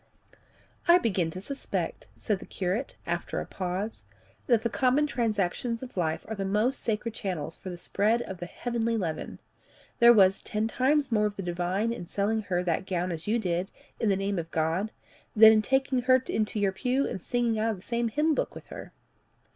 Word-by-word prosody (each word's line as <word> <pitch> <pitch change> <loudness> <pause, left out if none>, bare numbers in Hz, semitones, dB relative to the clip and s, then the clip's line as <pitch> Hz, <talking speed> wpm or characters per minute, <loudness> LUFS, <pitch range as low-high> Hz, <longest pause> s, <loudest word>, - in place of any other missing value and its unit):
"I 345 +1 +8
begin 190 - 0
to 185 - -6
suspect," 275 +7 -4
said 210 -4 -1
the - - -11
curate, 195 +8 -2
after - - -2
a - - -4
pause, 190 +4 -4 0.4
"that 235 -3 +3
the - - +2
common 265 +4 +3
transactions 230 -1 -1
of 255 - -9
life 160 -3 -1
are 220 - -4
the 200 -2 -3
most 210 +7 +1
sacred 225 0 -2
channels 180 -8 -4
for 185 - -8
the 175 - -6
spread 215 +6 +1
of 190 -2 -8
the 175 - -5
heavenly 230 +2 -1
leaven. 165 -6 -4 0.6
There 235 0 +9
was 195 -4 +5
ten 215 +1 -1
times 275 +3 +1
more 210 -2 +3
of 205 - -6
the 195 - -5
divine 180 +6 -1
in 175 -7 -7
selling 210 +4 0
her 180 -3 -1
that 180 +2 -1
gown 180 -1 -1
as 165 +1 -6
you 220 +3 +2
did, 180 -3 -1 0.3
in 220 - +1
the 195 - +3
name 195 -1 -1
of 165 0 -5
God, 165 +7 0 0.4
than 220 0 +10
in 215 - +4
taking 265 +2 +1
her 255 +1 +5
into 215 0 -1
your 200 -1 +2
pew 255 +7 0
and 190 - -5
singing 235 0 0
out 225 +1 +1
of 220 - -1
the 185 - -14
same 235 +1 -1
hymn 300 +7 +2
book - - -2
with - - -9
her." - - -9
210 Hz, 205 wpm, -28 LUFS, 185-235 Hz, 0.6 s, than